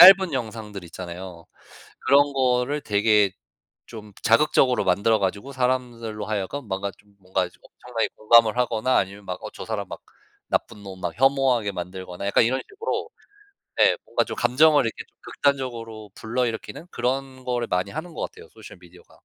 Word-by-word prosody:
짧은 190 Hz, -2 st, +10 dB
영상들 110 Hz, -5 st, -5 dB
있잖아요. 85 Hz, 0 st, -8 dB, 0.6 s
그런 145 Hz, +1 st, +5 dB
거를 130 Hz, +2 st, +1 dB
되게 105 Hz, -1 st, +3 dB, 0.6 s
좀 105 Hz, -3 st, -10 dB
자극적으로 125 Hz, +1 st, +4 dB
만들어 100 Hz, +4 st, +3 dB
가지고 100 Hz, +8 st, -2 dB
사람들로 120 Hz, -5 st, -2 dB
하여금 110 Hz, +6 st, -3 dB
뭔가 100 Hz, +1 st, -2 dB
좀 105 Hz, -1 st, -25 dB
뭔가 95 Hz, 0 st, -1 dB
엄청나게 120 Hz, -2 st, -5 dB
공감을 115 Hz, +1 st, +5 dB
하거나 125 Hz, 0 st, +1 dB
아니면 100 Hz, +1 st, -1 dB
막 90 Hz, -1 st, -5 dB
어 -, -, -6 dB
저 -, -, -7 dB
사람 105 Hz, -3 st, -3 dB
막 -, -, -8 dB, 0.5 s
나쁜 105 Hz, -, -2 dB
놈 95 Hz, -2 st, -9 dB
막 90 Hz, -2 st, -2 dB
혐오하게 130 Hz, -4 st, +3 dB
만들거나 90 Hz, +1 st, -6 dB
약간 100 Hz, -, +4 dB
이런 130 Hz, +3 st, +1 dB
식으로 425 Hz, +3 st, -3 dB, 0.7 s
네 -, -, +5 dB
뭔가 -, -, +1 dB
좀 -, -, -6 dB
감정을 145 Hz, +3 st, +5 dB
이렇게 115 Hz, -, -4 dB
좀 -, -, -36 dB
극단적으로 115 Hz, -6 st, -2 dB
불러일으키는 120 Hz, +7 st, -3 dB
그런 130 Hz, +1 st, -2 dB
거를 120 Hz, -2 st, -1 dB
많이 90 Hz, +2 st, -1 dB
하는 160 Hz, +3 st, -6 dB
것 -, -, -6 dB
같아요 -, -, -7 dB
소셜 -, -, -13 dB
미디어가. 90 Hz, 0 st, -18 dB
115 Hz, 365 characters per minute, -24 LUFS, 100-130 Hz, 0.7 s, 짧은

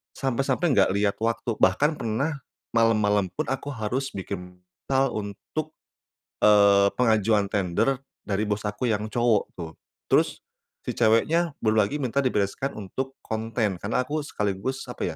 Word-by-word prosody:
sampai-sampai 135 Hz, +4 st, 0 dB
enggak 100 Hz, -7 st, +4 dB
liat 100 Hz, 0 st, +2 dB
waktu. 115 Hz, 0 st, -1 dB
Bahkan 150 Hz, +1 st, +3 dB
pernah 140 Hz, +7 st, -1 dB, 0.3 s
malem-malem 105 Hz, -4 st, +3 dB
pun -, -, 0 dB
aku 135 Hz, +1 st, -3 dB
harus 130 Hz, +2 st, -3 dB
bikin 90 Hz, -2 st, -6 dB, 0.3 s
proposal 135 Hz, -1 st, +2 dB
untuk 110 Hz, +9 st, -5 dB, 0.7 s
eee, 100 Hz, -1 st, +6 dB
pengajuan 110 Hz, -3 st, +3 dB
tender 105 Hz, +8 st, 0 dB, 0.2 s
dari 105 Hz, 0 st, 0 dB
bos 105 Hz, 0 st, -2 dB
aku 110 Hz, +3 st, -1 dB
yang 105 Hz, 0 st, -1 dB
cowok 120 Hz, 0 st, +2 dB
tuh. 85 Hz, -2 st, -6 dB, 0.4 s
Terus, -, -, +2 dB, 0.4 s
si -, -, -3 dB
ceweknya 145 Hz, +9 st, +2 dB
belum 110 Hz, 0 st, +3 dB
lagi 105 Hz, +7 st, +1 dB
minta 135 Hz, +1 st, 0 dB
dibereskan 130 Hz, +1 st, -1 dB
untuk 130 Hz, +6 st, -5 dB
konten, 110 Hz, -3 st, -2 dB
karena 110 Hz, +6 st, 0 dB
aku 150 Hz, +4 st, -2 dB
sekaligus 105 Hz, 0 st, -3 dB
apa 85 Hz, -8 st, -3 dB
110 Hz, 140 wpm, -25 LUFS, 100-135 Hz, 0.7 s, eee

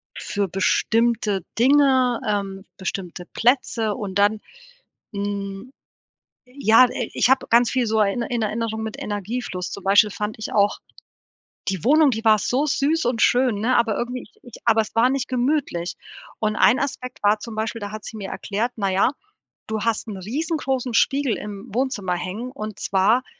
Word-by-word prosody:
für 200 Hz, -1 st, -2 dB
bestimmte 215 Hz, +2 st, +1 dB
Dinge, 260 Hz, -1 st, +4 dB
ähm, 195 Hz, -1 st, -2 dB
bestimmte 190 Hz, -2 st, -5 dB
Plätze 230 Hz, -3 st, +1 dB
und 200 Hz, -1 st, -3 dB
dann, 205 Hz, +1 st, +3 dB, 0.7 s
hm 200 Hz, +3 st, -4 dB, 0.8 s
ja, 250 Hz, -2 st, +5 dB
äh, 240 Hz, -1 st, -4 dB
ich -, -, +2 dB
habe 265 Hz, 0 st, +3 dB
ganz 235 Hz, +1 st, +5 dB
viel 255 Hz, -3 st, +1 dB
so 220 Hz, 0 st, +1 dB
in 205 Hz, +3 st, +1 dB
Er 235 Hz, -, -5 dB
in 240 Hz, -1 st, -1 dB
Erinnerung 220 Hz, +1 st, -2 dB
mit 220 Hz, -1 st, -5 dB
Energiefluss. 205 Hz, -2 st, -4 dB
Zum 200 Hz, -, -8 dB
Beispiel 205 Hz, +2 st, +5 dB
fand 210 Hz, +2 st, -4 dB
ich 220 Hz, -, -5 dB
auch, 205 Hz, -1 st, +3 dB, 0.9 s
die 190 Hz, -4 st, -2 dB
Wohnung, 300 Hz, +2 st, +5 dB
die 225 Hz, +1 st, -3 dB
war 215 Hz, -1 st, +6 dB
so 255 Hz, +8 st, 0 dB
süß 295 Hz, +1 st, +1 dB
und 245 Hz, -2 st, 0 dB
schön, 245 Hz, -4 st, +3 dB
ne, 250 Hz, +4 st, +2 dB
aber 230 Hz, -3 st, +2 dB
irgendwie 245 Hz, +1 st, -3 dB
ich -, -, -16 dB
ich 245 Hz, -, -13 dB
aber 225 Hz, -1 st, +4 dB
es 215 Hz, -, -10 dB
war 235 Hz, +3 st, +4 dB
nicht 275 Hz, 0 st, -1 dB
gemütlich. 250 Hz, -, -1 dB, 0.4 s
Und 215 Hz, -1 st, 0 dB
ein 240 Hz, +6 st, +5 dB
Aspekt 255 Hz, -2 st, -4 dB
war 210 Hz, +1 st, +3 dB
zum 220 Hz, 0 st, -8 dB
Beispiel, 220 Hz, +1 st, -3 dB
da 205 Hz, 0 st, -5 dB
hat 215 Hz, 0 st, -8 dB
sie 225 Hz, -, -8 dB
mir 200 Hz, -2 st, -6 dB
erklärt: 220 Hz, +4 st, -2 dB
„Na 200 Hz, -3 st, -1 dB
ja, 195 Hz, +6 st, +3 dB, 0.6 s
du 220 Hz, -1 st, -3 dB
hast 230 Hz, 0 st, -1 dB
'n 205 Hz, -, -5 dB
riesengroßen 265 Hz, -, -2 dB
Spiegel 270 Hz, +1 st, +2 dB
im 205 Hz, +1 st, -7 dB
Wohnzimmer 230 Hz, -8 st, -1 dB
hängen 200 Hz, +8 st, -5 dB
und 215 Hz, -5 st, -7 dB
zwar, 205 Hz, +6 st, +2 dB
220 Hz, 175 wpm, -22 LUFS, 205-250 Hz, 0.9 s, war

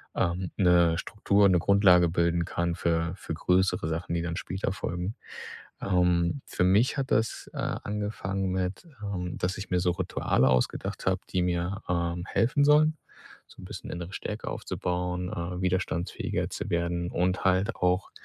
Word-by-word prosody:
ähm, 90 Hz, +1 st, 0 dB
'ne 85 Hz, -3 st, +4 dB
Struktur, 100 Hz, 0 st, +2 dB
'ne 90 Hz, -2 st, +4 dB
Grundlage 90 Hz, -2 st, +5 dB
bilden 85 Hz, 0 st, +1 dB
kann 85 Hz, 0 st, -1 dB
für 85 Hz, 0 st, 0 dB
für 80 Hz, -, -6 dB
größere 90 Hz, -1 st, +1 dB
Sachen, 85 Hz, +1 st, -2 dB
die 85 Hz, -, -1 dB
dann 85 Hz, -1 st, -3 dB
später 95 Hz, 0 st, -3 dB
folgen. 90 Hz, +2 st, -4 dB, 0.7 s
Ähm, 90 Hz, +4 st, +2 dB
für 90 Hz, -, 0 dB
mich 105 Hz, +10 st, +3 dB
hat 135 Hz, -1 st, -2 dB
das, 110 Hz, -1 st, 0 dB
äh, -, -, -5 dB
angefangen 100 Hz, -2 st, -2 dB
mit, 95 Hz, -, -2 dB, 0.2 s
ähm, 90 Hz, -4 st, -4 dB
dass 90 Hz, +2 st, -1 dB
ich 100 Hz, -, -7 dB
mir 90 Hz, 0 st, +2 dB
so 90 Hz, -1 st, +2 dB
Rituale -, -, +1 dB
ausgedacht 65 Hz, +6 st, -1 dB
habe, 95 Hz, 0 st, +2 dB
die 90 Hz, -, +1 dB
mir, 90 Hz, +3 st, -1 dB
ähm, 85 Hz, 0 st, -1 dB
helfen 135 Hz, +5 st, +2 dB
sollen. 155 Hz, +1 st, +5 dB, 0.5 s
So -, -, -15 dB
'n -, -, -8 dB
bisschen -, -, -8 dB
innere 85 Hz, +2 st, -6 dB
Stärke 105 Hz, +3 st, -5 dB
aufzubauen, 90 Hz, 0 st, -3 dB
äh, 90 Hz, +1 st, -4 dB
widerstandsfähiger 90 Hz, -1 st, -1 dB
zu -, -, -5 dB
werden 85 Hz, 0 st, -1 dB
und 90 Hz, +1 st, 0 dB
halt 95 Hz, +1 st, +2 dB
auch 90 Hz, +1 st, +1 dB
90 Hz, 160 wpm, -28 LUFS, 85-95 Hz, 0.7 s, Grundlage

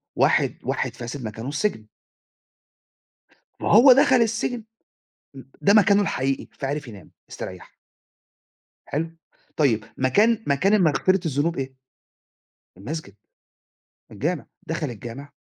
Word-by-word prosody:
واحد -, -, +2 dB
واحد -, -, -2 dB
فاسد 120 Hz, +2 st, -7 dB
مكانه 115 Hz, +4 st, -6 dB
السجن. 145 Hz, -, -2 dB, 1.7 s
ما -, -, -1 dB
هو 245 Hz, +6 st, +8 dB
دخل 275 Hz, +1 st, +4 dB
السجن، 230 Hz, 0 st, 0 dB, 0.7 s
إ -, -, -9 dB, 0.2 s
ده 200 Hz, -, +4 dB
مكانه 205 Hz, -1 st, +5 dB
الحقيقي، 135 Hz, -8 st, -1 dB
فعرف 145 Hz, +1 st, -3 dB
ينام، 105 Hz, -5 st, -12 dB, 0.2 s
استريَّح. -, -, -9 dB, 1.1 s
حلو، 160 Hz, +3 st, -3 dB, 0.5 s
طيب 115 Hz, -8 st, +2 dB
مكان 210 Hz, -, +3 dB
مكان 145 Hz, +9 st, +2 dB
المغفرة 185 Hz, 0 st, +3 dB
الذنوب 150 Hz, +3 st, 0 dB
إيه؟ 135 Hz, -1 st, -4 dB, 1.0 s
المسجد، 120 Hz, -, -7 dB, 1.0 s
الجامع، 140 Hz, -, -3 dB, 0.2 s
دخَل 160 Hz, -3 st, -3 dB
الجامع 120 Hz, +5 st, -9 dB
150 Hz, 105 wpm, -23 LUFS, 130-205 Hz, 1.7 s, هو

